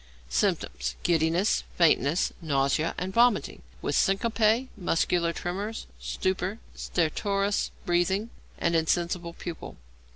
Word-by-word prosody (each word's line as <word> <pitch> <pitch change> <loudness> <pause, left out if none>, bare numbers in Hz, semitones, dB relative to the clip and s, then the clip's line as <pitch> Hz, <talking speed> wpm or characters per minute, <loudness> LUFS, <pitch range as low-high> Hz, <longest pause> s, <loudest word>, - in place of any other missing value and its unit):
Symptoms. 60 - 0
Giddiness, 170 +3 +2
fainting, 160 -2 +4 0.2
nausea, 145 +1 +1
and 185 +1 -3
vomiting, 235 0 +3 0.2
with - - -1
syncope, 220 +4 +2
muscular 170 -3 +1
tremors, 200 +6 -4
stupor, 190 +2 -2 0.2
stertorous 195 +4 0 0.2
breathing, 190 +6 +1 0.3
and 170 0 +1
insensible 170 +1 0
pupil. 170 -1 -7
180 Hz, 95 wpm, -27 LUFS, 170-200 Hz, 0.3 s, fainting